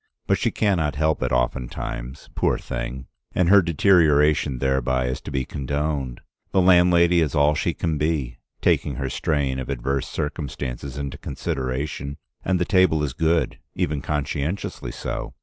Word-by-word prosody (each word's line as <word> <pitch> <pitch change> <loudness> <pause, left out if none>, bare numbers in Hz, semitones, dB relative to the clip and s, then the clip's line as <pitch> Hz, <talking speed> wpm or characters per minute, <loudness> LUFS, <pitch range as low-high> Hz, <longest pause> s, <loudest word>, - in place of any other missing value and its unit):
But - - +2
she - - +2
can 100 -4 +1
not 75 -3 0
help 80 +1 +1
it - - 0
oftentimes, - - -3
poor - - +1
thing, 65 +1 -5 0.3
and 90 -2 +3
her 100 +1 +8
deterioration 75 -5 +3
thereby 65 -1 +1
is 65 +1 -3
to - - -8
be 65 -2 -1
condoned. 70 -2 -3 0.3
The 95 - +4
landlady 90 -1 +5
is 80 -1 0
all 75 +1 +4
she 80 +1 -1
can 80 -3 -1
be, 70 -6 -1 0.2
taking - - +2
her 65 -1 -3
strain 70 -3 0
of 65 - -5
adverse 70 +1 -1
circumstances 70 -3 -4
into 70 -1 -5
consideration, 70 +2 -3 0.3
and 95 0 +1
the 90 - +1
table 95 -5 +3
is 70 -4 -2
good, 80 +2 +1 0.2
even 75 -1 -1
conscientiously 75 +4 -3
so. - - -5
75 Hz, 155 wpm, -23 LUFS, 65-80 Hz, 0.3 s, her